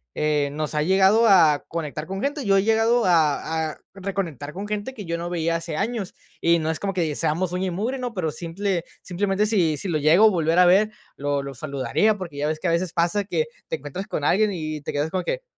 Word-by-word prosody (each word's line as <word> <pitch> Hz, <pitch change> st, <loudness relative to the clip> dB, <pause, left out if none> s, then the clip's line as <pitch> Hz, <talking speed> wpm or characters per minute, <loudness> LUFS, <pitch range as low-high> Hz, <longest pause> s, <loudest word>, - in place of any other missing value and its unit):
eh, 150 Hz, -2 st, +1 dB
nos 155 Hz, +1 st, -3 dB
ha 150 Hz, -, +2 dB
llegado 190 Hz, +6 st, +4 dB
a 165 Hz, -8 st, +5 dB
conectar 155 Hz, -2 st, -5 dB
con 195 Hz, +1 st, -4 dB
gente. 285 Hz, +1 st, -2 dB
Yo 195 Hz, -1 st, +4 dB
he 195 Hz, -, +3 dB
llegado 225 Hz, +2 st, +3 dB
a 160 Hz, -1 st, +2 dB
a -, -, -13 dB, 0.2 s
reconectar 185 Hz, -8 st, -4 dB
con 200 Hz, +3 st, -6 dB
gente 210 Hz, +5 st, -4 dB
que 210 Hz, -5 st, -7 dB
yo 170 Hz, 0 st, -2 dB
no 170 Hz, +1 st, -4 dB
veía 170 Hz, -1 st, 0 dB
hace 165 Hz, -2 st, -4 dB
años. 210 Hz, -2 st, -2 dB, 0.3 s
Y 170 Hz, 0 st, +4 dB
no 160 Hz, 0 st, -1 dB
es 160 Hz, -, -5 dB
como 195 Hz, -1 st, -2 dB
que 165 Hz, -5 st, -1 dB
seamos 170 Hz, +5 st, -1 dB
uña 185 Hz, +1 st, -1 dB
y -, -, -2 dB
mugre, 225 Hz, +9 st, -2 dB
¿no? 245 Hz, -2 st, -4 dB
Pero 160 Hz, -5 st, -1 dB
simple 175 Hz, +2 st, -3 dB, 0.2 s
simplemente 195 Hz, +3 st, 0 dB
si 180 Hz, -8 st, +1 dB
si 195 Hz, -, -4 dB
lo 155 Hz, -3 st, 0 dB
llego 160 Hz, +8 st, +5 dB
a -, -, +8 dB
volver 165 Hz, -3 st, +1 dB
a 180 Hz, -, +7 dB
ver, 200 Hz, +4 st, +4 dB, 0.2 s
lo 145 Hz, 0 st, -1 dB
lo 140 Hz, 0 st, -6 dB
saludaría. 140 Hz, -, 0 dB
Porque 170 Hz, -7 st, -7 dB
ya 145 Hz, -, -1 dB
ves 155 Hz, 0 st, -2 dB
que 185 Hz, -, -2 dB
a -, -, +2 dB
veces 170 Hz, +1 st, 0 dB
pasa 175 Hz, +4 st, +1 dB
que 465 Hz, -, -1 dB, 0.2 s
te 485 Hz, -, -2 dB
encuentras 195 Hz, -, -7 dB
con 150 Hz, -, -3 dB
alguien, 205 Hz, +7 st, +3 dB
y 155 Hz, -4 st, -4 dB
te -, -, -4 dB
quedas 145 Hz, +2 st, -1 dB
como 185 Hz, -, -1 dB
de -, -, -20 dB
que, -, -, -26 dB
175 Hz, 245 wpm, -23 LUFS, 155-200 Hz, 0.3 s, a